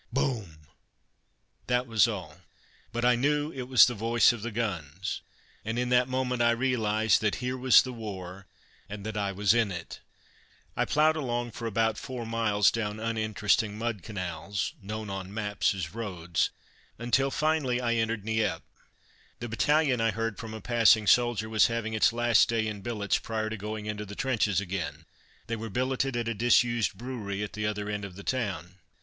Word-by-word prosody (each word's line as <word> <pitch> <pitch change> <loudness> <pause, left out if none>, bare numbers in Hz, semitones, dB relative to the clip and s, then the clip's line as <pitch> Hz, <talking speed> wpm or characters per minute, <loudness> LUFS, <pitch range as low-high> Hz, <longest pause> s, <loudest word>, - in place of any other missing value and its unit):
"Boom!" 115 - -2 1.0
That 125 0 +1
was 115 -2 +4
all; 90 -9 -6 0.5
but 120 +1 -1
I 125 0 +5
knew 145 +4 +1
it 130 -4 -6
was 130 -2 +8
the 120 - -1
voice 115 +2 +3
of 120 - -7
the 120 - -3
guns, 95 -7 -3 0.4
and 110 +2 -3
in 125 0 0
that 125 0 +4
moment 130 -1 -1
I 120 - +5
realized 115 -3 +2
that 110 -2 +1
here 125 +1 -3
was 130 0 +6
the 130 - -6
war, 95 -4 -7 0.4
and 100 0 -7
that 110 -1 -4
I 100 -1 -1
was 100 +1 +3
in 115 -4 +2
it. 85 -2 -7 0.8
I - - +1
ploughed 155 +1 +3
along 120 -5 -2
for 115 +1 -5
about 110 0 0
four 125 -3 -6
miles 110 -3 +2
down 105 -2 -3
uninteresting 110 -1 0
mud 115 -3 -3
canals 90 0 -4
known 105 +1 -5
on 95 -1 -5
maps 105 -1 0
as 90 -3 -5
roads 90 -7 -1 0.5
until, 120 +4 +1
finally, 150 -4 +1
I 120 -2 0
entered 115 -2 -1
Nieppe. 110 0 0 0.8
The 120 - -5
battalion, 135 +3 +2
I 115 - +3
heard 115 0 -3
from 110 -1 -6
a 110 - -8
passing 115 -1 +4
soldier, 120 -1 +3
was 110 -1 +4
having 115 -1 -3
its 110 - +4
last 120 -1 +3
day 115 -1 +1
in 105 -2 -4
billets 105 -1 -1
prior 110 -1 -3
to - - -2
going 105 +1 -5
into 105 -1 -4
the 105 - -8
trenches 110 -8 +1
again. 85 -5 -4 0.4
They 115 +1 -3
were 115 0 -6
billeted 130 +3 -1
at 120 -1 -2
a 115 - 0
disused 120 -1 +2
brewery 105 -4 -4
at 105 - -6
the 105 -1 -2
other 105 -1 -3
end 105 -1 -3
of 100 -2 -7
the 100 - -10
town. 95 -8 -3
110 Hz, 180 wpm, -28 LUFS, 105-120 Hz, 1.0 s, was